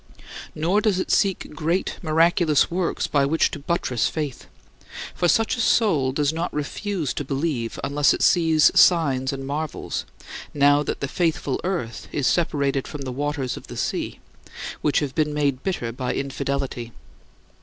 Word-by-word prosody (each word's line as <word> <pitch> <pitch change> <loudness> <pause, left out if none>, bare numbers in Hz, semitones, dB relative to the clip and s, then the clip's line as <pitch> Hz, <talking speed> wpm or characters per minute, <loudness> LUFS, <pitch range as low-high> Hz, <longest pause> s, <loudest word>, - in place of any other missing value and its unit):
Nor 175 +7 +1
does 210 -4 +2
it - - -2
seek 195 -5 +1
great, 165 +5 -1
miraculous 165 -1 +3
works 175 0 -1
by 145 -2 +2
which 155 +4 +2
to - - -6
buttress 140 -6 0
faith. 150 -5 -5 0.7
For 175 - +1
such 225 +9 +2
a - - -7
soul 160 - +3
does 145 +2 0
not 165 +2 -2
refuse 155 +2 -3
to - - -3
believe 135 -4 -2
unless 145 +1 +3
it - - 0
sees 160 -3 +5
signs 135 -7 +4
and 135 -1 -5
marvels, 150 +2 -4 0.5
now 145 0 +5
that 150 - -4
"the 140 - -1
faithful 160 -3 -1
earth" 175 -11 -3
is 145 - -1
separated 140 -5 +1
from 150 - -7
"the 130 -1 -4
waters" 140 -1 -2
of - - -11
the - - -8
sea, - - -2 0.6
which 150 - +2
have 140 -3 -3
been 150 0 0
made 140 -3 0
bitter 145 -11 -2
by 125 +1 -3
infidelity. 135 -3 -3
150 Hz, 160 wpm, -23 LUFS, 135-170 Hz, 0.7 s, sees